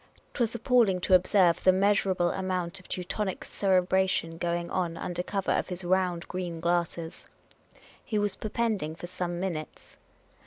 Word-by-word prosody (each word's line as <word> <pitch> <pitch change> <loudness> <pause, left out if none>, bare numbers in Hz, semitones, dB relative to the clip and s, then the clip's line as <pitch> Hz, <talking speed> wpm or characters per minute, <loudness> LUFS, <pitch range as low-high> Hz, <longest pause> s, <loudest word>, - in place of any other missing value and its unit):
'T - - -4
was 235 0 +1
appalling 235 -5 +3
to 185 - 0
observe 180 -2 +4
the 185 - +7
measurable 190 -2 +2
amount 185 -1 -2
of 185 - -17
Teu 180 - -3
tonic 195 +1 -3
cerebration 185 -3 +1
going 170 0 -1
on 170 -3 -1
under 175 0 -3
cover 195 +1 -2
of - - 0
his 180 0 -5
round, 180 -1 0
green 180 -3 -4
glasses. 170 -1 -2 0.8
He 220 - -2
was 205 -1 +1
perpending 215 -8 -2
for 175 - -8
some 175 -1 -4
minutes. 170 -5 -5
185 Hz, 155 wpm, -28 LUFS, 175-195 Hz, 0.8 s, the